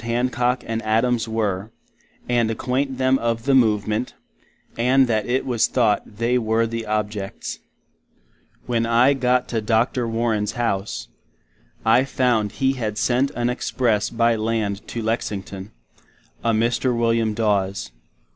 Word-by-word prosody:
Hancock 125 Hz, +1 st, 0 dB
and 115 Hz, 0 st, -2 dB
Adams 115 Hz, +1 st, +1 dB
were, 105 Hz, -3 st, -2 dB, 0.6 s
and 120 Hz, -2 st, +2 dB
acquaint 130 Hz, +4 st, -1 dB
them 130 Hz, 0 st, +2 dB
of 115 Hz, 0 st, -2 dB
the 140 Hz, -, +3 dB
Movement, 110 Hz, -2 st, +2 dB, 0.6 s
and 130 Hz, +3 st, +4 dB
that 110 Hz, -4 st, 0 dB
it 125 Hz, +2 st, 0 dB
was 120 Hz, -4 st, +2 dB
thought 110 Hz, -3 st, 0 dB
they 120 Hz, +2 st, +1 dB
were 110 Hz, 0 st, +1 dB
the 115 Hz, -1 st, -4 dB
objets. 105 Hz, -2 st, -3 dB, 1.1 s
When 115 Hz, -2 st, 0 dB
I 120 Hz, +4 st, +4 dB
got 125 Hz, -2 st, +1 dB
to 115 Hz, -2 st, -1 dB
Dr. 115 Hz, +2 st, +1 dB
Warren's 115 Hz, -2 st, -1 dB
house, 110 Hz, -4 st, -2 dB, 0.8 s
I 115 Hz, +3 st, +5 dB
found 120 Hz, -6 st, 0 dB
he 135 Hz, -1 st, +1 dB
had 110 Hz, -5 st, -3 dB
sent 125 Hz, +5 st, +2 dB
an 120 Hz, 0 st, 0 dB
express 120 Hz, -4 st, 0 dB
by 115 Hz, 0 st, +2 dB
land 110 Hz, -2 st, -2 dB
to 115 Hz, -, -4 dB
Lexington—a 100 Hz, -, -6 dB
Mr. 120 Hz, +2 st, +1 dB
Wm. 115 Hz, -2 st, +1 dB
Daws. 100 Hz, -2 st, 0 dB
115 Hz, 130 wpm, -22 LUFS, 110-125 Hz, 1.1 s, I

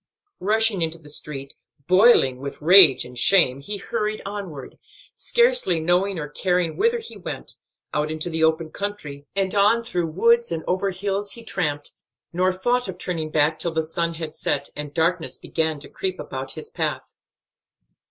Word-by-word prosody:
Rushing 215 Hz, -1 st, +2 dB
into 165 Hz, 0 st, -1 dB
the 150 Hz, -2 st, -11 dB
street, 140 Hz, -2 st, -6 dB, 0.3 s
boiling 185 Hz, -, +5 dB
with 140 Hz, +1 st, -7 dB
rage 160 Hz, -5 st, +7 dB
and 125 Hz, -, -12 dB
shame, 130 Hz, +1 st, +4 dB
he 205 Hz, +9 st, -3 dB
hurried 215 Hz, +1 st, -3 dB
onward, 195 Hz, -10 st, -7 dB, 0.3 s
scarcely 480 Hz, -, +2 dB
knowing 180 Hz, +4 st, +1 dB
or 150 Hz, -2 st, -4 dB
caring 180 Hz, +2 st, -1 dB
whither 465 Hz, +3 st, +2 dB
he 460 Hz, -1 st, -9 dB
went; -, -, -7 dB, 0.4 s
out 150 Hz, +1 st, 0 dB
into 155 Hz, +1 st, -3 dB
the 160 Hz, -1 st, -1 dB
open 160 Hz, 0 st, +1 dB
country, 150 Hz, -9 st, -6 dB
and 195 Hz, -1 st, +1 dB
on 210 Hz, +3 st, +4 dB
through 175 Hz, -7 st, -1 dB
woods 235 Hz, +8 st, +2 dB
and 160 Hz, -1 st, -3 dB
over 190 Hz, +2 st, 0 dB
hills 200 Hz, +2 st, -2 dB
he 235 Hz, -, -7 dB
tramped, 150 Hz, -8 st, -2 dB, 0.4 s
nor 185 Hz, +2 st, +2 dB
thought 245 Hz, +7 st, 0 dB
of 185 Hz, -2 st, -6 dB
turning 165 Hz, -4 st, -3 dB
back 155 Hz, +1 st, +1 dB
till 170 Hz, -, -1 dB
the 160 Hz, 0 st, 0 dB
sun 170 Hz, +1 st, -2 dB
had 160 Hz, -1 st, -6 dB
set, 140 Hz, -2 st, -1 dB
and 150 Hz, -1 st, -6 dB
darkness 170 Hz, +1 st, 0 dB
began 160 Hz, -2 st, -2 dB
to -, -, -10 dB
creep 380 Hz, -1 st, -4 dB
about -, -, -6 dB
his 445 Hz, -, -9 dB
path. -, -, -3 dB
175 Hz, 170 wpm, -23 LUFS, 155-200 Hz, 0.4 s, rage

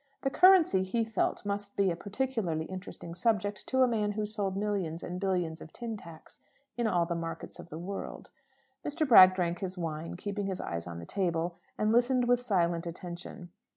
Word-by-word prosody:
The 270 Hz, -, +1 dB
currency, 360 Hz, -, +6 dB
he 195 Hz, +5 st, 0 dB
felt, 220 Hz, -2 st, -1 dB
must 205 Hz, 0 st, -3 dB
be 195 Hz, -2 st, +3 dB
a -, -, -2 dB
peculiarly 200 Hz, -5 st, -2 dB
interesting 185 Hz, -2 st, -8 dB
subject 205 Hz, 0 st, 0 dB
to 260 Hz, 0 st, +3 dB
a -, -, +5 dB
man 210 Hz, -3 st, 0 dB
who 210 Hz, 0 st, -1 dB
sold 205 Hz, -3 st, -2 dB
millions 195 Hz, -5 st, -2 dB
and 180 Hz, +1 st, -4 dB
billions 180 Hz, -4 st, -1 dB
of 160 Hz, -, -10 dB
tin 235 Hz, -2 st, -5 dB
tacks 165 Hz, -6 st, -12 dB, 0.4 s
in 240 Hz, -2 st, 0 dB
all 175 Hz, -5 st, +2 dB
the 170 Hz, -, -2 dB
markets 165 Hz, -1 st, -5 dB
of -, -, -10 dB
the 160 Hz, -, -7 dB
world. 190 Hz, +4 st, -6 dB, 0.5 s
Mr. 305 Hz, +1 st, -1 dB
Bragg 185 Hz, -6 st, +9 dB
drank 175 Hz, -2 st, -1 dB
his 185 Hz, -1 st, -4 dB
wine, 165 Hz, -1 st, -4 dB
keeping 205 Hz, +1 st, -3 dB
his 190 Hz, -2 st, -2 dB
eyes 85 Hz, 0 st, -4 dB
on 85 Hz, -1 st, -6 dB
the 85 Hz, -, -7 dB
table, 170 Hz, -, -1 dB, 0.2 s
and 215 Hz, 0 st, +2 dB
listened 245 Hz, +1 st, +3 dB
with 245 Hz, 0 st, +4 dB
silent 175 Hz, -7 st, +1 dB
attention. 175 Hz, +2 st, -7 dB
190 Hz, 190 wpm, -30 LUFS, 170-220 Hz, 0.5 s, Bragg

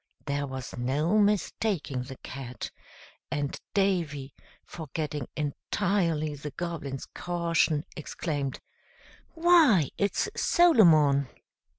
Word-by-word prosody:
There 145 Hz, 0 st, -1 dB
was 130 Hz, -1 st, -6 dB
no 150 Hz, +11 st, +1 dB
mistaking 200 Hz, -, 0 dB
the 130 Hz, +1 st, -8 dB
Cat, 130 Hz, -2 st, -7 dB, 0.6 s
and 145 Hz, -1 st, -2 dB, 0.2 s
Davy, 165 Hz, -9 st, 0 dB, 0.3 s
forgetting 150 Hz, -3 st, -5 dB
entirely 155 Hz, +1 st, -1 dB
the 145 Hz, +1 st, -6 dB
Goblin's 145 Hz, -4 st, -5 dB
caution, 170 Hz, -3 st, 0 dB
exclaimed, 145 Hz, -3 st, -3 dB, 0.8 s
"Why! 325 Hz, -, +5 dB
it's 200 Hz, -, +1 dB
Solomon!" 160 Hz, -, +5 dB
155 Hz, 85 wpm, -28 LUFS, 140-185 Hz, 0.8 s, Why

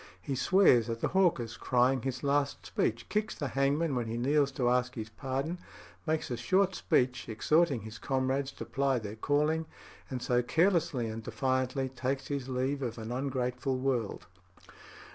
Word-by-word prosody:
He 115 Hz, +10 st, -4 dB
swears 130 Hz, -, +4 dB
at 115 Hz, 0 st, -3 dB
the -, -, 0 dB
hawkers 170 Hz, -12 st, +1 dB
crying 125 Hz, 0 st, +2 dB
his 130 Hz, +1 st, -4 dB
last 140 Hz, 0 st, 0 dB
speech, 115 Hz, +1 st, -1 dB
kicks 215 Hz, +1 st, -1 dB
the 145 Hz, -4 st, -3 dB
hangman 140 Hz, +3 st, +1 dB
when 120 Hz, -3 st, -1 dB
he 115 Hz, +1 st, -3 dB
kneels 140 Hz, +3 st, +2 dB
to 125 Hz, -2 st, 0 dB
ask 125 Hz, 0 st, +1 dB
his 110 Hz, -2 st, -5 dB
pardon, 135 Hz, +8 st, -3 dB, 0.5 s
makes 155 Hz, -4 st, -1 dB
a 120 Hz, -, -1 dB
short 185 Hz, +10 st, +2 dB
speech 125 Hz, -7 st, +1 dB
exhorting 140 Hz, +4 st, +2 dB
his 110 Hz, +2 st, -9 dB
comrades 135 Hz, +1 st, 0 dB
to -, -, -7 dB
ply 135 Hz, -1 st, +1 dB
their 110 Hz, -2 st, -5 dB
calling, 150 Hz, +6 st, +1 dB, 0.4 s
and 130 Hz, -, -3 dB
so 125 Hz, 0 st, +2 dB
carelessly 160 Hz, -3 st, +2 dB
and 110 Hz, +1 st, -5 dB
defiantly 130 Hz, +2 st, -1 dB
takes 130 Hz, +1 st, -3 dB
his 140 Hz, -3 st, -3 dB
leave 130 Hz, +2 st, -1 dB
of 120 Hz, -3 st, -3 dB
an 110 Hz, 0 st, -6 dB
ungrateful 130 Hz, 0 st, -1 dB
world. 130 Hz, -5 st, -1 dB
130 Hz, 165 wpm, -31 LUFS, 120-145 Hz, 0.5 s, swears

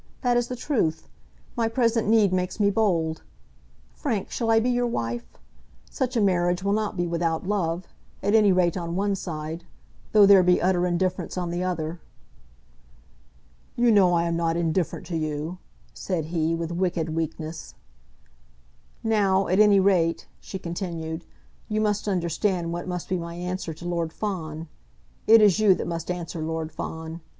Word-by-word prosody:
That 245 Hz, -1 st, +3 dB
is 240 Hz, 0 st, +1 dB
the 250 Hz, -, -4 dB
truth. 215 Hz, -, -1 dB, 0.5 s
My 230 Hz, -1 st, +1 dB
present 230 Hz, -2 st, +1 dB
need 215 Hz, -3 st, +4 dB
makes 180 Hz, +3 st, -1 dB
me 200 Hz, -1 st, +3 dB
bold. 170 Hz, -7 st, 0 dB, 0.7 s
Frank, 230 Hz, -, -3 dB
shall 230 Hz, -2 st, -2 dB
I 225 Hz, 0 st, +5 dB
be 245 Hz, +3 st, +1 dB
your 245 Hz, 0 st, +1 dB
wife? 120 Hz, -, -4 dB, 0.5 s
Such 255 Hz, -2 st, -1 dB
a -, -, +3 dB
marriage 180 Hz, -2 st, +2 dB
will 200 Hz, 0 st, +1 dB
not 215 Hz, -1 st, -1 dB
be 175 Hz, -, 0 dB
without 165 Hz, 0 st, -1 dB
love, 180 Hz, -3 st, -1 dB, 0.4 s
at 205 Hz, -, +1 dB
any 215 Hz, -3 st, +6 dB
rate 180 Hz, -2 st, +2 dB
on 170 Hz, -2 st, -3 dB
one 200 Hz, +1 st, +1 dB
side, 160 Hz, -3 st, -5 dB, 0.5 s
though 210 Hz, -2 st, +7 dB
there 195 Hz, -1 st, +8 dB
be 180 Hz, 0 st, +4 dB
utter 180 Hz, 0 st, +2 dB
indifference 180 Hz, +1 st, -1 dB
on 175 Hz, -1 st, -2 dB
the 175 Hz, +1 st, -2 dB
other!" 170 Hz, -2 st, -3 dB, 1.7 s
"You 240 Hz, 0 st, +4 dB
know 190 Hz, -4 st, +5 dB
I 170 Hz, -, +2 dB
am 170 Hz, 0 st, -1 dB
not 165 Hz, 0 st, 0 dB
indifferent 170 Hz, +1 st, -1 dB
to 170 Hz, 0 st, -4 dB
you," 155 Hz, +3 st, -3 dB, 0.3 s
said 175 Hz, -5 st, -3 dB
he, 165 Hz, 0 st, +1 dB
with 165 Hz, 0 st, -4 dB
wicked 170 Hz, -2 st, -1 dB
weakness. 160 Hz, 0 st, -5 dB, 1.3 s
"Now, 200 Hz, -4 st, +2 dB
at 185 Hz, +3 st, +2 dB
any 205 Hz, -2 st, +6 dB
rate," 180 Hz, -4 st, +2 dB
she 190 Hz, -, -7 dB
continued, 170 Hz, -2 st, -5 dB, 0.4 s
"you 215 Hz, 0 st, 0 dB
must 210 Hz, -1 st, 0 dB
understand 175 Hz, -1 st, 0 dB
what 175 Hz, +2 st, -5 dB
must 180 Hz, -1 st, -4 dB
be 185 Hz, -1 st, -1 dB
my 170 Hz, 0 st, -6 dB
answer 180 Hz, 0 st, -4 dB
to 175 Hz, +2 st, -8 dB
Lord 170 Hz, -2 st, -1 dB
Fawn. 165 Hz, -5 st, -4 dB, 0.6 s
It 225 Hz, -1 st, +8 dB
is 205 Hz, -1 st, +5 dB
you 205 Hz, -3 st, +5 dB
that -, -, -4 dB
must 170 Hz, 0 st, -4 dB
answer 175 Hz, -2 st, -4 dB
Lord 160 Hz, 0 st, -3 dB
Fawn. 160 Hz, +1 st, -6 dB
180 Hz, 165 wpm, -25 LUFS, 165-205 Hz, 1.7 s, there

